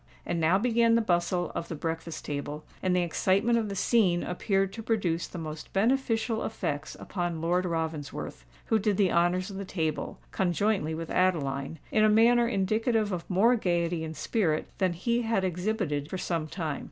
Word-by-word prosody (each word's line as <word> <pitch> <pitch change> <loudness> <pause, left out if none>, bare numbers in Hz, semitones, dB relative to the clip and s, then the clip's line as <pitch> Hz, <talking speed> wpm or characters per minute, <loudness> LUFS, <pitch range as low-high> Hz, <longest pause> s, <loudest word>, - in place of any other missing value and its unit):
And 170 - -1
now 165 +3 +4
began 230 +1 +3
the 230 - +4
bustle 175 -3 0
of 165 - -4
the 165 - -5
breakfast 165 +1 -4
table, 145 +1 -4 0.2
and 185 -1 +1
the 180 - +3
excitement 195 +7 +2
of 215 -2 -2
the 200 - -4
scene 190 -5 +3
appeared 195 +1 0
to 225 - -6
produce 195 -7 0
the - - -9
most 155 -2 -7
beneficial 225 +1 +1
effects 150 -8 -3
upon 175 -3 -3
Lord 175 +3 +1
Ravensworth, 160 - -4 0.2
who 220 - +2
did 205 -1 +1
the 195 -3 +3
honours 180 +3 +2
of 195 - -7
the 200 - -4
table, 160 -5 -3
conjointly 180 -2 0
with 165 0 -5
Adeline, 150 -5 0
in 215 - +3
a 215 - +6
manner 235 +2 +5
indicative 215 +1 +1
of 175 -2 -4
more 210 +7 +4
gaiety 175 -5 0
and 160 -1 -6
spirit 160 -2 0
than 185 -3 +2
he 235 +7 0
had 225 -4 0
exhibited 180 -5 -1
for 190 - -3
some 165 -3 -2
time. 160 -3 -3
180 Hz, 180 wpm, -28 LUFS, 165-215 Hz, 0.2 s, a